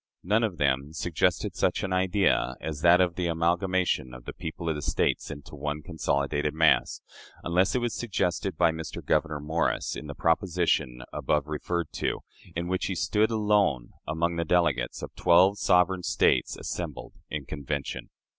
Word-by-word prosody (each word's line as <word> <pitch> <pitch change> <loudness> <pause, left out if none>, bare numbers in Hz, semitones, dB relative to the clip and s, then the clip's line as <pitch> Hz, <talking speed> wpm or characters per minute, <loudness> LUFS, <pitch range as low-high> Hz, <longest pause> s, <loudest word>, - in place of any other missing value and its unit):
None 105 +5 +2
of 100 -6 -1
them 70 +1 0
suggested 80 0 0
such - - +1
an 95 - -2
idea 95 -8 +2
as 75 -2 -5
that 85 +1 +6
of 90 -2 +3
the 90 0 -2
amalgamation 85 -4 0
of 60 - -12
the - - -6
people 80 +1 -6
of 80 - +2
the 75 - -5
States - - 0
into 75 -1 -9
one 75 +1 -4
consolidated 75 -2 -1
mass 80 0 +3 0.4
unless 90 +5 +2
it 125 - +1
was 120 -1 -1
suggested 95 -5 -1
by 80 - +4
Mr. 80 0 -7
Gouverneur 75 -1 +1
Morris 80 +3 -1
in 75 - -7
the 70 - -7
proposition 80 -7 +1
above 75 -1 0
referred 75 +2 -3
to, - - -2 0.3
in 85 +1 -2
which 95 +1 -1
he 95 - -2
stood 105 +5 +2
alone 105 - +1 0.2
among 85 +2 -1
the 85 - +1
delegates 75 -8 +1
of - - -7
twelve 90 +3 +4
sovereign 90 0 +3
States - - +2
assembled - - -5 0.2
in 75 -3 -4
convention. 70 -1 -4
85 Hz, 165 wpm, -27 LUFS, 75-90 Hz, 0.4 s, that